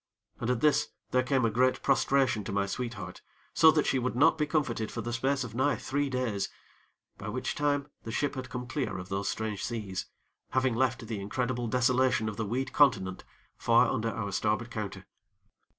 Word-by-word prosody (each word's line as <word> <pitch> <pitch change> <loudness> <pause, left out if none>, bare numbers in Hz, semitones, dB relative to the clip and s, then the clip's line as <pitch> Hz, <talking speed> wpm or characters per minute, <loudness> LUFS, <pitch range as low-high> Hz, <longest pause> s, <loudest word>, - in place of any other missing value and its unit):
And 110 - -2
at 125 -2 +1
this, 150 -1 +3 0.2
there 125 - +4
came 130 -1 +1
a 115 - +2
great 130 +3 +2
prostration 135 -4 +2
to - - -4
my 100 0 +1
sweetheart 105 -4 -5 0.3
so 160 - +7
that 155 -1 +3
she 130 - +2
would 125 -1 -2
not 155 +6 +5
be 150 -1 0
comforted 130 -8 -1
for - - -4
the 120 - -4
space 135 +3 +1
of 120 - -7
nigh 130 +5 +2
three 140 +1 -1
days, 125 -6 -1 0.7
by 105 - -5
which 130 +4 -2
time 145 -1 0 0.2
the 115 - -6
ship 145 +5 0
had 130 -2 -6
come 125 -1 -5
clear 125 -1 -2
of 90 0 -7
those 100 +1 -1
strange 110 -2 -3
seas, 105 -4 -4 0.5
having 130 -1 +2
left 120 -1 0
the 110 -2 -4
incredible 120 +4 -2
desolation 125 -1 +2
of 110 - -3
the 110 0 -3
weed 130 +5 -2
continent 95 -10 +3 0.4
far 115 -1 +4
under 115 -3 0
our 105 -3 -3
starboard 110 +4 0
counter. 105 -3 -5
120 Hz, 195 wpm, -29 LUFS, 110-130 Hz, 0.7 s, so